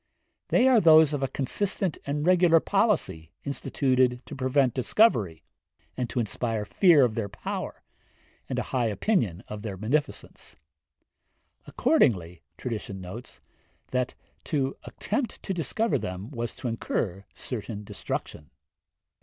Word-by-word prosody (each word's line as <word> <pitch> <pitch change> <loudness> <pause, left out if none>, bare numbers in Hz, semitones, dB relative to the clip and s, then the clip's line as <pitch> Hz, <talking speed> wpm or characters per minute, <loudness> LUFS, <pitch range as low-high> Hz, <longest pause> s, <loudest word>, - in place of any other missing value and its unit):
They 255 - +4
are 250 -4 +6
those 160 -3 +7
of 145 - -2
a 135 - +1
consistent 180 +7 0
and 150 +2 -1
regular 175 -2 +5
policy 175 - 0
instituted 130 -3 0
to - - -8
prevent 130 -1 +2
discovery, 115 - +2 0.5
and 125 -2 -3
to - - -2
inspire 115 -1 -2
fear 165 - +5
of 115 - -1
their 110 -2 -3
power, 100 - -6 0.7
and - - -2
a - - 0
high 125 -3 +2
opinion 105 - 0
of 105 -1 -7
their 100 -3 -5
beneficence. 140 +9 -3 1.1
Accordingly 90 -6 +2 0.2
tradition 105 -5 -5
notes, 95 +7 -9 0.5
that 125 0 -1 0.3
to 135 -3 -1
attempt 235 +3 -3
to 195 - -2
discover 185 - 0
them 95 +6 -6
was 120 -3 -4
to 130 - -5
incur 100 -4 -2
certain 110 -3 -5
destruction. 75 -6 -6
125 Hz, 130 wpm, -27 LUFS, 105-155 Hz, 1.1 s, those